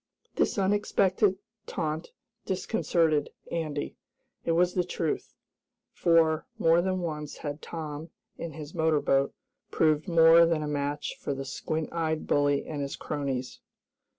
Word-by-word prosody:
This - - +1
unexpected 195 0 +2 0.3
taunt 160 -1 -3 0.4
disconcerted 170 -6 +1 0.2
Andy. 155 -3 -3 0.5
It 165 - +1
was 180 +2 +3
the 180 - +2
truth, 165 -2 -3 0.6
for, 165 +2 +3
more 165 -4 +4
than 185 0 -1
once 150 -3 -4
had 145 0 -5
Tom, 155 -1 -6 0.3
in 165 -2 -6
his 150 0 -8
motor 160 -2 +2
boat, 135 -1 +2 0.4
proved 155 +1 +2
more 165 -1 +7
than 165 -2 +1
a - - -3
match 145 0 -2
for 140 - -3
the 135 0 -5
squint 155 +3 -3
eyed 160 -2 -1
bully 145 -1 +2
and 150 -2 -4
his 140 -1 -3
cronies. 130 -3 -3
160 Hz, 135 wpm, -28 LUFS, 145-170 Hz, 0.6 s, more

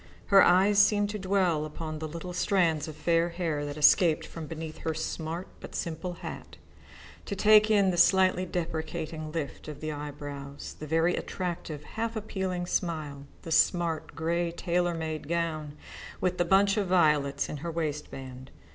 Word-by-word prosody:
Her 195 - +10
eyes 195 +3 +5
seemed 205 0 +4
to 210 - -4
dwell 185 -5 +1
upon 155 0 -6
the 155 - -4
little 170 +3 -7
strands 175 -5 +1
of 155 - -7
fair 170 +2 +1
hair 165 -4 -2
that 145 +1 -6
escaped 160 +2 +5
from 165 -2 -8
beneath 160 -1 -7
her 160 -1 -2
smart 160 +2 -4
but - - -9
simple 170 +2 -3
hat, - - -8 0.7
to 200 - -3
take 215 +2 +6
in 200 -3 +4
the 175 - -3
slightly 185 +1 +4
deprecating 160 -2 -4
lift 155 -5 -5
of 150 -2 -7
the 155 0 -4
eyebrows, 145 -1 -7
the 155 - -6
very 165 +3 +2
attractive, 170 -5 -4
half 225 +7 -4
appealing 190 -4 -3
smile, 155 -6 -3 0.2
the 165 - -7
smart 165 -1 +2
grey 170 +1 0
tailor 175 0 0
made 160 -2 -4
gown 155 -3 -2 0.4
with 180 -1 -1
the 175 - +3
bunch 195 +3 +4
of 200 -2 0
violets 150 -6 +2
in 150 - -5
her 165 +4 -5
waistband. 140 -5 -5
165 Hz, 165 wpm, -28 LUFS, 155-185 Hz, 0.7 s, Her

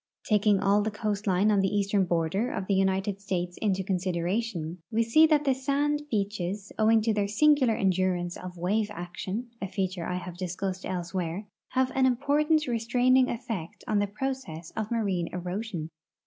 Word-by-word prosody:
Taking 210 -2 +3
all 200 +1 +3
the 215 - 0
coastline 205 -2 +1
on 205 - +3
the 195 - +3
eastern 200 -1 +2
border 175 +6 0
of 190 - -3
the 200 - 0
United 195 +1 +1
States 180 -3 -2
into 195 -3 +1
consideration, 180 -1 -2
we 230 0 +2
see 310 +8 +6
that 300 -2 +3
the 275 -2 +3
sand 285 +3 0
beaches, 200 -2 -2
owing 220 0 +4
to 220 0 +2
their 205 -1 0
singular 260 +2 +4
endurance 185 -2 0
of 180 -1 -8
wave 205 +5 0
action 195 +5 -5
(a 195 - -2
feature 185 -2 -2
I 180 - -2
have 180 -1 -6
discussed 185 +1 -3
elsewhere), 180 +1 -3 0.3
have 260 0 +2
an 265 -1 +4
important' 295 +5 +2
restraining 250 +2 +3
efiect 225 -9 -5
on 210 -1 +2
the 205 - +1
process 205 -8 -5
of 220 -1 -2
marine 195 -7 0
erosion. 180 -2 -4
200 Hz, 165 wpm, -28 LUFS, 185-230 Hz, 0.3 s, see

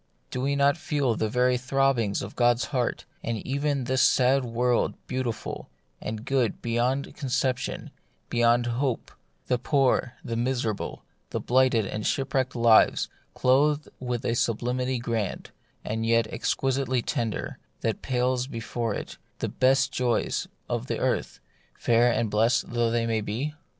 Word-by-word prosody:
Do 125 - -2
we 140 +2 +1
not 140 +2 +3
feel 145 -7 0
the 110 0 -1
very 125 +2 +2
throbbings 130 -5 +1
of - - -8
God's 120 -1 +3
heart, 125 -3 -1 0.2
and 115 0 -2
see - - -7
even 140 0 0
this 130 +1 +1
sad 130 +1 +4
world 120 0 +1
beautiful 125 -3 -4 0.3
and 110 +1 -5
good 135 -5 +1
beyond 120 +4 -1
concep 130 -2 0
tion, - - -5 0.4
beyond 120 0 +3
hope; 120 +1 -1 0.3
the 125 - 0
poor, 130 -2 +2
the 115 - -3
miserable, 120 -3 -2 0.3
the - - -2
blighted 125 -3 +3
and 105 +2 -4
shipwrecked 130 -1 0
lives 115 -2 +5 0.3
clothed 145 +4 +3
with 125 -1 -3
a 115 - +1
sublimity 125 +3 0
grand, 115 -4 -3 0.3
and 110 +1 -2
yet 115 0 +3
exquisitely 130 0 0
tender, 115 -3 -3 0.2
that 110 - -1
pales 125 0 0
before 115 -2 -3
it - - -7 0.2
the - - -2
best 135 +1 +3
joys 125 -2 0 0.2
of - - -3
earth, - - -1 0.4
fair 120 +1 +3
and 115 -2 0
blessed 115 +4 +2
though 120 -1 +1
they 115 -1 0
be 120 +9 -3
125 Hz, 145 wpm, -26 LUFS, 115-130 Hz, 0.4 s, lives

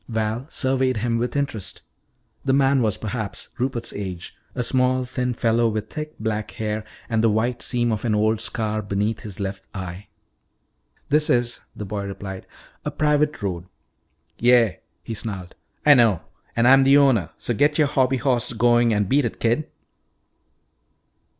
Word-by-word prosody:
Val 110 +3 -2
surveyed 130 -4 +1
him 115 +1 0
with 125 +3 -2
interest. 140 -8 -3 0.6
The 135 - +1
man 135 -1 +4
was, 110 -4 +1
perhaps, 110 -2 -5
Rupert's 125 -2 -2
age, 90 -3 -6 0.2
a 125 - -1
small, 130 0 +1
thin 125 -1 -2
fellow 115 0 +2
with 110 0 -4
thick 155 -1 -6
black 110 -1 -2
hair 110 -2 -3 0.2
and 110 -1 +1
the 115 - +5
white 115 +3 0
seam 120 -2 0
of 110 -2 -2
an 110 -3 +1
old 110 +1 +2
scar 110 -2 -1
beneath 100 +2 -1
his 105 -2 -8
left 95 -1 -4
eye. 95 +1 -6 1.0
"This 150 +1 +3
is," 120 -1 +1 0.2
the 105 - -6
boy 100 +1 -4
replied, 95 -1 -7 0.4
"a - - -2
private 150 -3 +1
road." 90 -3 -3 0.7
"Yeah," 120 -4 +4 0.3
he 115 - -5
snarled, 100 -5 -5 0.3
"I 150 - +9
know. 115 - +4 0.3
And 120 +1 +3
I'm 135 +1 +7
the 135 +1 +6
owner. 130 - +4
So - - -2
get 145 +1 +2
your 155 - +5
hobby 135 -2 +2
horse 125 -2 0
going 120 +1 +4
and 105 -1 +1
beat 140 +4 +3
it, 115 - -4
kid." 120 +7 +1
115 Hz, 165 wpm, -23 LUFS, 105-130 Hz, 1.0 s, I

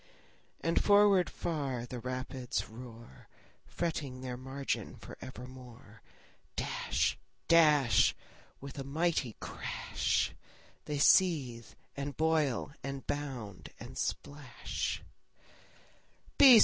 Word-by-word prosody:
And 165 +1 +2
forward 205 -3 +6
far 140 -7 -2
the 125 0 -6
rapids 130 0 -3
roar, 115 - -12 0.4
Fretting 145 -6 -3
their 125 -1 -4
margin 135 +2 -3
for - - -10
evermore. 125 -4 -11 0.5
Dash, - - 0 0.3
dash, 150 -7 +6 0.4
With 140 +1 -8
a - - -3
mighty 145 -4 0
crash, - - -1 0.5
They 150 - -2
seethe, 140 -8 +3 0.2
and 140 0 -4
boil, 155 -5 +2
and 135 -1 -5
bound, 130 -9 -4
and - - -9
splash. 145 -4 -3
135 Hz, 90 wpm, -32 LUFS, 125-150 Hz, 0.5 s, forward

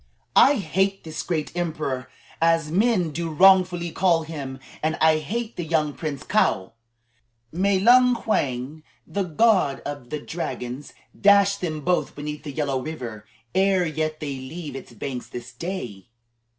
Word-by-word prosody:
"I 285 - +7
hate 195 - 0
this 160 -1 -5
great 160 -2 -3
emperor, 155 -7 -3 0.3
as 165 -2 +2
men 190 -3 +2
do 165 +2 -3
wrongfully 180 0 +4
call 170 -3 +2
him, 140 -5 -6 0.2
and 155 +1 0
I 160 0 +5
hate 225 +9 -4
the 175 - -2
young 155 -2 0
Prince 150 -4 -5
Kaou. 95 +4 +1 0.8
May 190 +4 +2
Lung 245 +4 +5
Wang, 140 - -1 0.2
the 200 - -3
god 185 -4 +2
of 145 -4 -7
the 150 - -3
dragons, 130 -4 -5 0.2
dash 200 0 +5
them 155 -4 -3
both 180 +4 0
beneath 150 +1 -5
the 150 -1 -6
Yellow 140 -2 -1
River 120 -8 -7 0.3
ere 190 -1 +3
yet 155 -1 -2
they 140 -3 -4
leave 145 +2 -7
its 135 - -9
banks 125 +2 -5
this 125 0 -8
day." 120 - -6
160 Hz, 150 wpm, -24 LUFS, 140-185 Hz, 0.8 s, I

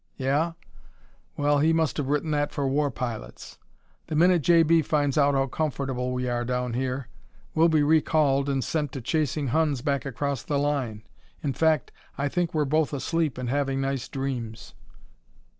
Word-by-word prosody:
Yeah? 145 +5 0 0.8
Well, 145 0 +2
he 160 +3 +3
must 160 -2 +1
have 145 -3 -1
written 150 +2 0
that 145 -1 0
for 140 -1 -1
war 145 +2 +1
pilots. 120 -3 -6 0.5
The 155 - -3
minute 175 +2 +4
J.B. 165 +1 +5
finds 145 -2 0
out 145 -1 +3
how 135 0 +2
comfortable 135 -3 -2
we 125 0 -2
are 120 0 -1
down 125 0 -2
here 130 +1 -2 0.5
we'll 165 +2 +4
be 155 -2 +3
recalled 145 -2 +3
and 135 -2 0
sent 150 -4 -2
to 135 - -5
chasing 150 +1 -1
Huns 145 -2 +1
back 140 -2 0
across 140 -1 -3
the 145 - -2
line. 135 -7 -1 0.4
In 140 - -1
fact, 160 -3 +1 0.3
I 140 +1 0
think 175 +2 -1
we're 155 -2 +1
both 150 +1 +1
asleep 155 0 -1
and 125 -1 -4
having 135 -1 0
nice 135 -2 -2
dreams." 125 -5 -5
140 Hz, 170 wpm, -26 LUFS, 130-155 Hz, 0.8 s, J.B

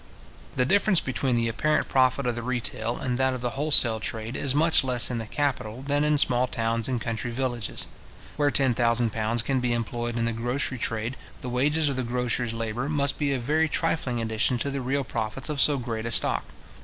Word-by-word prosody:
The 125 - +2
difference 195 +3 +3
between 130 0 -1
the 115 0 +1
apparent 150 +7 0
profit 130 +1 +2
of 120 - +1
the 120 - -5
retail 120 -1 -2
and 125 -1 -2
that 130 -1 +2
of 125 - -6
the 120 -1 -2
wholesale 135 -6 +5
trade, 110 +2 -4
is 140 -1 -1
much 160 0 +5
less 125 -2 +1
in 120 - -2
the 115 - -6
capital 130 -3 -2
than 145 +1 0
in 150 0 +2
small 125 -2 +2
towns 115 -1 -1
and 130 -2 -1
country 115 +1 -3
villages. 120 -2 -3 0.5
Where 145 -1 +2
ten 135 -3 +4
thousand 115 -1 +1
pounds 110 +1 -1
can 130 +1 0
be 125 -1 0
employed 120 0 -3
in 115 - 0
the 115 - 0
grocery 125 +3 -2
trade, 115 +3 -3 0.2
the 125 - -5
wages 145 +5 +1
of 140 -2 -1
the - - 0
grocer's 120 -1 -1
labour 115 +4 -3
must 140 -2 0
be 145 -2 0
a 135 - 0
very 155 +6 +1
trifling 150 -7 -1
addition 110 +2 0
to 140 +4 -2
the 135 -1 -3
real 135 +2 -1
profits 115 +3 -3
of 145 -3 0
so 145 -2 +4
great 115 -3 -4
a - - -3
stock. - - +2
125 Hz, 215 wpm, -26 LUFS, 115-140 Hz, 0.5 s, wholesale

